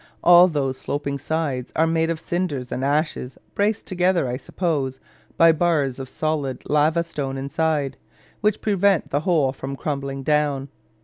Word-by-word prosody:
All 175 Hz, +1 st, +8 dB
those 135 Hz, -6 st, -2 dB
sloping 140 Hz, -1 st, -3 dB
sides 145 Hz, -4 st, -2 dB
are 160 Hz, -, +3 dB
made 165 Hz, 0 st, +1 dB
of 165 Hz, -1 st, -2 dB
cinders 160 Hz, -8 st, -3 dB
and 130 Hz, -, -2 dB
ashes, 145 Hz, -3 st, -1 dB, 0.2 s
braced 210 Hz, +2 st, 0 dB
together, 180 Hz, -5 st, +1 dB
I 125 Hz, -, -2 dB
suppose, 140 Hz, -3 st, -2 dB, 0.4 s
by 165 Hz, 0 st, +7 dB
bars 155 Hz, -5 st, +1 dB
of 130 Hz, -1 st, -6 dB
solid 150 Hz, -4 st, -2 dB
lava 155 Hz, +3 st, +2 dB
stone 140 Hz, -5 st, -4 dB
inside, 140 Hz, 0 st, -1 dB, 0.4 s
which 210 Hz, -1 st, +1 dB
prevent 200 Hz, -3 st, +2 dB
the 145 Hz, -, +2 dB
whole 155 Hz, -5 st, +2 dB
from 135 Hz, 0 st, -6 dB
crumbling 140 Hz, -1 st, -4 dB
down. 145 Hz, -2 st, +1 dB
150 Hz, 150 wpm, -23 LUFS, 135-170 Hz, 0.4 s, All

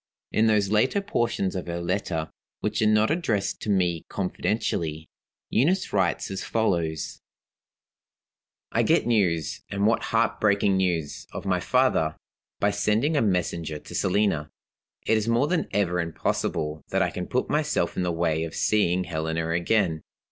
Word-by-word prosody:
In 110 Hz, +1 st, +3 dB
those 105 Hz, -2 st, +2 dB
later 120 Hz, -, +3 dB
portions 120 Hz, -, -1 dB
of 90 Hz, -, -4 dB
her 85 Hz, 0 st, -3 dB
letter, 85 Hz, -3 st, -2 dB, 0.3 s
which -, -, -1 dB
are 110 Hz, -, +4 dB
not 110 Hz, +3 st, +3 dB
addressed 110 Hz, -, -1 dB
to -, -, -4 dB
me 90 Hz, -4 st, +1 dB
confidentially, 85 Hz, -5 st, -2 dB, 0.4 s
Eunice 175 Hz, +11 st, +2 dB
writes 95 Hz, -1 st, +1 dB
as 95 Hz, -, -4 dB
follows: 85 Hz, -8 st, -1 dB, 1.5 s
"I -, -, +2 dB
get -, -, +3 dB
news 90 Hz, -10 st, +1 dB
and 100 Hz, 0 st, 0 dB
what 115 Hz, +1 st, +2 dB
heartbreaking 100 Hz, -3 st, +2 dB
news! 85 Hz, -5 st, -1 dB
of -, -, -6 dB
my 90 Hz, -2 st, +1 dB
father, 90 Hz, -7 st, +2 dB, 0.4 s
by 100 Hz, -, +2 dB
sending 105 Hz, +9 st, +1 dB
a 145 Hz, -, +3 dB
messenger 85 Hz, -6 st, -1 dB
to -, -, -12 dB
Selina. 95 Hz, -6 st, +1 dB, 0.6 s
It 110 Hz, -, +3 dB
is 110 Hz, +1 st, -1 dB
more 115 Hz, +4 st, +3 dB
than 175 Hz, -1 st, 0 dB
ever 90 Hz, -3 st, +1 dB
impossible 80 Hz, -2 st, -2 dB
that 95 Hz, 0 st, +2 dB
I 90 Hz, -, -1 dB
can 90 Hz, -1 st, -5 dB
put 125 Hz, -, 0 dB
myself 150 Hz, 0 st, 0 dB
in -, -, -1 dB
the 90 Hz, -1 st, 0 dB
way 80 Hz, -1 st, 0 dB
of 80 Hz, -, -6 dB
seeing 95 Hz, -4 st, +2 dB
Helena 80 Hz, -1 st, -2 dB
again. 85 Hz, -1 st, +1 dB
95 Hz, 155 wpm, -26 LUFS, 85-110 Hz, 1.5 s, are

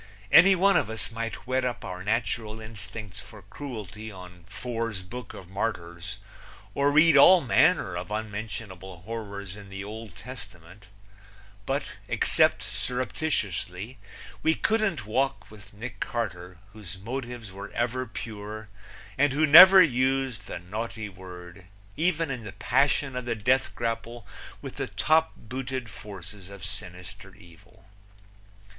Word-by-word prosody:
Any 195 Hz, +2 st, +8 dB
one 195 Hz, +2 st, +4 dB
of -, -, 0 dB
us 110 Hz, +1 st, -4 dB
might 115 Hz, 0 st, -5 dB
whet 130 Hz, +1 st, 0 dB
up 125 Hz, -1 st, -3 dB
our 90 Hz, 0 st, -6 dB
natural 110 Hz, 0 st, -1 dB
instincts 110 Hz, -2 st, -8 dB
for 105 Hz, -3 st, -12 dB
cruelty 110 Hz, -2 st, -7 dB
on 90 Hz, -2 st, -12 dB
Fore's 115 Hz, -3 st, -4 dB
Book 115 Hz, +4 st, -8 dB
of 90 Hz, -, -10 dB
Martyrs, 90 Hz, -2 st, -4 dB, 0.6 s
or 140 Hz, +1 st, +2 dB
read 155 Hz, +1 st, +6 dB
of 140 Hz, -, +9 dB
all 185 Hz, +4 st, +8 dB
manner 150 Hz, -, +3 dB
of 90 Hz, +2 st, -5 dB
unmentionable 105 Hz, -4 st, -6 dB
horrors 100 Hz, -3 st, -6 dB
in 100 Hz, -1 st, -11 dB
the 95 Hz, 0 st, -6 dB
Old 110 Hz, -1 st, -8 dB
Testament, 95 Hz, -6 st, -11 dB, 0.8 s
but -, -, 0 dB, 0.2 s
except -, -, +3 dB
surreptitiously 110 Hz, -, -2 dB, 0.4 s
we 160 Hz, 0 st, +3 dB
couldn't 215 Hz, -, +1 dB
walk 130 Hz, +4 st, -1 dB
with 105 Hz, -1 st, -12 dB
Nick 105 Hz, -1 st, -8 dB
Carter, 90 Hz, -6 st, -4 dB, 0.2 s
whose 95 Hz, -4 st, -9 dB
motives 120 Hz, 0 st, -6 dB
were 100 Hz, +2 st, -8 dB
ever 125 Hz, +2 st, -1 dB
pure 110 Hz, -1 st, -7 dB, 0.5 s
and 140 Hz, -1 st, +4 dB
who 155 Hz, +3 st, +3 dB
never 185 Hz, +5 st, +11 dB
used 130 Hz, -, 0 dB
the -, -, -5 dB
naughty 110 Hz, +4 st, -5 dB
word 90 Hz, -1 st, -11 dB, 0.3 s
even 165 Hz, -2 st, +1 dB
in 125 Hz, -3 st, -4 dB
the 100 Hz, -3 st, -8 dB
passion 135 Hz, +4 st, +1 dB
of 125 Hz, -1 st, -3 dB
the 120 Hz, -1 st, -1 dB
death 125 Hz, +5 st, +1 dB
grapple 115 Hz, 0 st, -3 dB, 0.4 s
with -, -, -7 dB
the -, -, -2 dB
top 160 Hz, +1 st, +2 dB
booted 130 Hz, +1 st, -5 dB
forces 100 Hz, -2 st, -10 dB
of 100 Hz, -1 st, -8 dB
sinister 95 Hz, 0 st, -6 dB
evil. 85 Hz, -1 st, -19 dB
110 Hz, 140 wpm, -27 LUFS, 95-130 Hz, 0.8 s, never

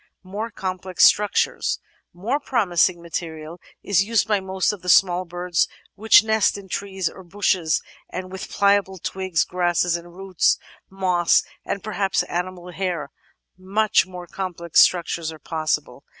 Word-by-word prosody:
More 205 Hz, +5 st, -5 dB
Complex 185 Hz, -3 st, 0 dB
Structures 210 Hz, -1 st, +2 dB, 0.3 s
More 225 Hz, +11 st, -2 dB
promising 185 Hz, -, +1 dB
material 165 Hz, 0 st, -6 dB, 0.2 s
is 195 Hz, -2 st, +3 dB
used 225 Hz, 0 st, +1 dB
by 210 Hz, -2 st, +2 dB
most 190 Hz, -1 st, 0 dB
of 205 Hz, -3 st, -8 dB
the 180 Hz, -, -5 dB
small 180 Hz, 0 st, +4 dB
birds 175 Hz, 0 st, 0 dB, 0.3 s
which 220 Hz, +2 st, +6 dB
nest 220 Hz, -2 st, +2 dB
in 195 Hz, -1 st, -11 dB
trees 190 Hz, -1 st, -3 dB
or -, -, -7 dB
bushes, 180 Hz, -3 st, 0 dB, 0.3 s
and 185 Hz, 0 st, -6 dB
with 190 Hz, +1 st, -7 dB
pliable 200 Hz, -1 st, +2 dB
twigs, 185 Hz, -2 st, -1 dB
grasses 175 Hz, -1 st, +1 dB
and 170 Hz, 0 st, -8 dB
roots, 190 Hz, -3 st, +1 dB, 0.3 s
moss, 185 Hz, -3 st, +2 dB, 0.2 s
and 200 Hz, -, -4 dB
perhaps 200 Hz, -2 st, 0 dB
animal 180 Hz, 0 st, -5 dB
hair, 175 Hz, -6 st, -3 dB, 0.5 s
much 200 Hz, +2 st, +2 dB
more 180 Hz, -1 st, -9 dB
complex 175 Hz, -2 st, +1 dB
struc 175 Hz, -2 st, -4 dB
tures 165 Hz, -1 st, -3 dB
are 160 Hz, -, -10 dB
possible. 155 Hz, +1 st, -3 dB
185 Hz, 145 wpm, -22 LUFS, 175-195 Hz, 0.5 s, which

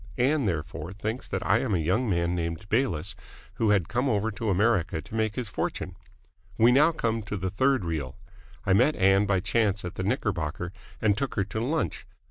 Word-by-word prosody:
Ann, 135 Hz, +2 st, +2 dB
therefore, 80 Hz, -1 st, -3 dB
thinks 110 Hz, +5 st, -4 dB
that -, -, -3 dB
I -, -, +4 dB
am 110 Hz, -7 st, 0 dB
a -, -, +2 dB
young 95 Hz, +9 st, +1 dB
man 85 Hz, -2 st, +1 dB
named 85 Hz, +1 st, -3 dB
Bayliss 105 Hz, -, 0 dB, 0.4 s
who 110 Hz, -, +2 dB
has 100 Hz, -3 st, +4 dB
come 125 Hz, +3 st, 0 dB
over 110 Hz, -1 st, +1 dB
to 110 Hz, +2 st, -3 dB
America 95 Hz, -4 st, +2 dB
to 80 Hz, -, -12 dB
make 110 Hz, -1 st, 0 dB
his 125 Hz, -3 st, -3 dB
fortune. -, -, -3 dB, 0.6 s
We 115 Hz, +2 st, +6 dB
now 150 Hz, +6 st, +5 dB
come 115 Hz, -8 st, -1 dB
to 105 Hz, 0 st, -4 dB
the 95 Hz, 0 st, -2 dB
third 130 Hz, +1 st, +2 dB
reel. 75 Hz, -6 st, -3 dB, 0.5 s
I 95 Hz, -, +3 dB
met 125 Hz, +10 st, +4 dB
Ann 95 Hz, +2 st, +4 dB
by 95 Hz, -2 st, +2 dB
chance 105 Hz, -1 st, +1 dB
at 90 Hz, -, -5 dB
the 95 Hz, -, -4 dB
Knickerbocker 90 Hz, -3 st, -2 dB, 0.3 s
and 105 Hz, -2 st, +4 dB
took 135 Hz, +4 st, -3 dB
her 100 Hz, -, +2 dB
to 100 Hz, +3 st, -4 dB
lunch. 145 Hz, +7 st, -2 dB
105 Hz, 200 wpm, -27 LUFS, 90-115 Hz, 0.6 s, We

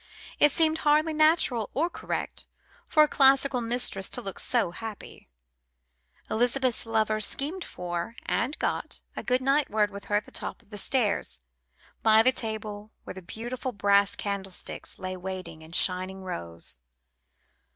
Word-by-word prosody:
It 295 Hz, -, +7 dB
seemed 320 Hz, +1 st, +3 dB
hardly 305 Hz, +1 st, +3 dB
natural 310 Hz, -8 st, +3 dB
or 315 Hz, +6 st, +2 dB
correct -, -, -5 dB, 0.4 s
for 305 Hz, -, +6 dB
a -, -, +3 dB
classical 275 Hz, -2 st, +4 dB
mistress 230 Hz, -5 st, -1 dB
to -, -, -1 dB
look 195 Hz, -, -5 dB
so 235 Hz, -8 st, +1 dB
happy. 220 Hz, +3 st, -8 dB, 1.0 s
Elizabeth's 245 Hz, +1 st, +1 dB
lover 220 Hz, -1 st, +1 dB
schemed 300 Hz, -, 0 dB
for 175 Hz, +4 st, -5 dB
and 270 Hz, +6 st, -1 dB
got -, -, -2 dB
a -, -, -4 dB
goodnight 270 Hz, +3 st, +2 dB
word 210 Hz, -1 st, +2 dB
with 200 Hz, 0 st, -9 dB
her 205 Hz, -, 0 dB
at 210 Hz, -, +1 dB
the -, -, -14 dB
top -, -, -4 dB
of -, -, -30 dB
the 205 Hz, -, -4 dB
stairs, 215 Hz, -, 0 dB, 0.6 s
by 220 Hz, 0 st, +6 dB
the 255 Hz, -, +5 dB
table 215 Hz, -3 st, -5 dB
where -, -, -7 dB
the 190 Hz, -, -9 dB
beautiful 240 Hz, +7 st, -5 dB
brass 200 Hz, -1 st, +3 dB
candlesticks 195 Hz, -2 st, -4 dB
lay 185 Hz, 0 st, -4 dB
waiting 185 Hz, -3 st, -6 dB
in 160 Hz, +1 st, -13 dB
shining 185 Hz, +2 st, +1 dB
rows. 85 Hz, -, -5 dB
220 Hz, 150 wpm, -27 LUFS, 195-265 Hz, 1.0 s, It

